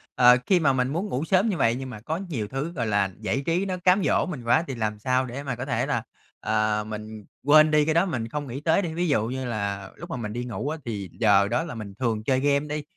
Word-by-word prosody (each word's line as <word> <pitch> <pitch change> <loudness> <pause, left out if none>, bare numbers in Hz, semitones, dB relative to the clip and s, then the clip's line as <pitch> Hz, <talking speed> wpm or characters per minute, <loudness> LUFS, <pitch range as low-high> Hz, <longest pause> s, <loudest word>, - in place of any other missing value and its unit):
ờ, 125 0 +7
khi 185 - +4
mà 140 -5 +3
mình 125 -1 +1
muốn 170 +9 -2
ngủ 135 +5 -2
sớm 190 +6 +3
như 190 - -1
vậy 115 -4 +2
nhưng 130 +1 -6
mà 115 -4 -8
có 160 +2 -2
nhiều 155 - -4
thứ, 135 +8 -4
gọi 120 -9 -3
là, 100 -2 +2
giải 115 +5 -1
trí 175 +4 +1
nó 185 -2 -2
cám 180 +2 +3
dỗ - - +2
mình 150 -10 -6
quá 120 +8 +3
thì 135 - -4
làm 110 -2 -2
sao 130 +3 +1
để 130 +3 -6
mà 130 -4 -3
có 125 - -5
thể 135 - 0
là, - - -1 0.4
à, 110 -1 +1
mình 110 0 -8 0.2
quên 155 +2 +6
đi 150 -1 +4
cái 160 - +1
đó, 170 +3 +3
mình 120 -11 -3
không 145 +4 -4
nghĩ 135 +3 -6
tới 165 +5 +3
đi? 165 -4 -4
Ví 175 +2 -1
dụ 115 -8 +1
như 130 +2 -4
là 100 -4 -3
lúc 170 +3 -9
mà - - -3
mình 105 -3 -5
đi 120 +1 -3
ngủ 120 +3 -4
á 160 - -3
thì 100 -5 -4
giờ 100 -3 +5
đó 120 +7 0
là 160 -7 -7
mình 105 -3 -7
thường 110 -4 -1
chơi 130 +2 +2
game 140 +1 +1
đi, 150 0 -3
130 Hz, 280 wpm, -25 LUFS, 110-155 Hz, 0.4 s, ờ